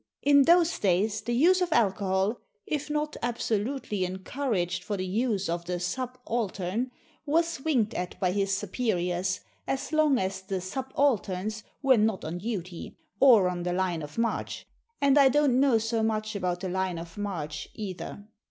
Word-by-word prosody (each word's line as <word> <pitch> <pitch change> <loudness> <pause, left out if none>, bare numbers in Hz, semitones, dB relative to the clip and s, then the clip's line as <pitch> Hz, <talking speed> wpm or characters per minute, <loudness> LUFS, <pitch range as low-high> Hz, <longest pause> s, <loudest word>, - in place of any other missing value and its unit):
In 280 -1 +6
those 340 0 +4
days 205 +3 +1
the 240 - -2
use 360 +8 +5
of 360 -1 0
alcohol, 195 -2 +1 0.3
if 300 0 -3
not 300 0 -1
absolutely 230 -2 -1
encouraged 185 -1 -2
for 205 - -3
the 185 - -2
use 205 0 0
of 170 +1 -2
the 180 0 -2
subaltern, 235 0 -2 0.4
was 330 -1 +1
winked 245 -9 +1
at 180 0 -4
by 180 -2 +1
his 195 0 0
superiors, 185 -4 -1 0.3
as 270 +3 -3
long 305 -3 +4
as 190 -1 -2
the 190 0 -3
subalterns 215 -2 -1 0.2
were 265 -2 +5
not 215 -3 +1
on 165 +3 -4
duty, 185 -5 -5 0.2
or 235 -9 +7
on 180 -1 -2
the 175 0 -1
line 180 -3 0
of 150 0 -9
march 230 0 -2 0.3
and 280 0 +5
I 275 -1 +7
don't 275 -2 +3
know 270 -4 +4
so 225 +1 -1
much 215 -1 -1
about 180 -2 -2
the 190 - -3
line 185 -1 -1
of 165 0 -8
march, 155 -8 -4
either. 205 0 -6
210 Hz, 160 wpm, -28 LUFS, 185-260 Hz, 0.4 s, or